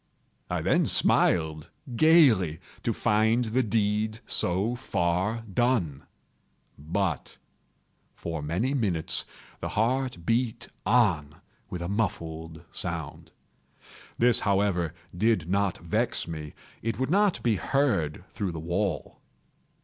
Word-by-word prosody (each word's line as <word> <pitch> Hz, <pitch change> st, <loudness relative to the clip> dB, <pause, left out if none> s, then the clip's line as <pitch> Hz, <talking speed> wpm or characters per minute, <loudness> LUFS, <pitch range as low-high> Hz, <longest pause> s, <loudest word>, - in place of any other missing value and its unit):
I -, -, -1 dB
then -, -, +3 dB
smiled 80 Hz, -2 st, +2 dB, 0.3 s
gaily, 120 Hz, -, +5 dB, 0.2 s
to -, -, 0 dB
find 110 Hz, +3 st, +2 dB
the 115 Hz, +4 st, +1 dB
deed 110 Hz, 0 st, 0 dB
so 95 Hz, +7 st, +1 dB
far 95 Hz, -1 st, 0 dB
done. 105 Hz, -, 0 dB, 0.7 s
But, 85 Hz, +2 st, -2 dB, 0.8 s
for 80 Hz, -2 st, -4 dB
many 90 Hz, -, -1 dB
minutes, 100 Hz, -, 0 dB, 0.3 s
the -, -, -4 dB
heart 120 Hz, -5 st, 0 dB
beat 115 Hz, +1 st, 0 dB, 0.2 s
on 90 Hz, -11 st, +3 dB, 0.3 s
with 90 Hz, -4 st, -4 dB
a -, -, -3 dB
muffled 80 Hz, -5 st, -3 dB
sound. 85 Hz, -4 st, -5 dB, 0.9 s
This, 120 Hz, 0 st, +4 dB
however, 95 Hz, -5 st, +1 dB, 0.2 s
did 105 Hz, -3 st, +2 dB
not 100 Hz, 0 st, +1 dB
vex 85 Hz, 0 st, -1 dB
me; 75 Hz, -3 st, -6 dB, 0.3 s
it 115 Hz, -2 st, -2 dB
would 130 Hz, +4 st, -1 dB
not 200 Hz, -1 st, +3 dB
be 115 Hz, -4 st, +2 dB
heard 90 Hz, -, 0 dB
through 100 Hz, -5 st, -2 dB
the 80 Hz, -, -5 dB
wall. 85 Hz, 0 st, -2 dB
100 Hz, 110 wpm, -27 LUFS, 85-115 Hz, 0.9 s, gaily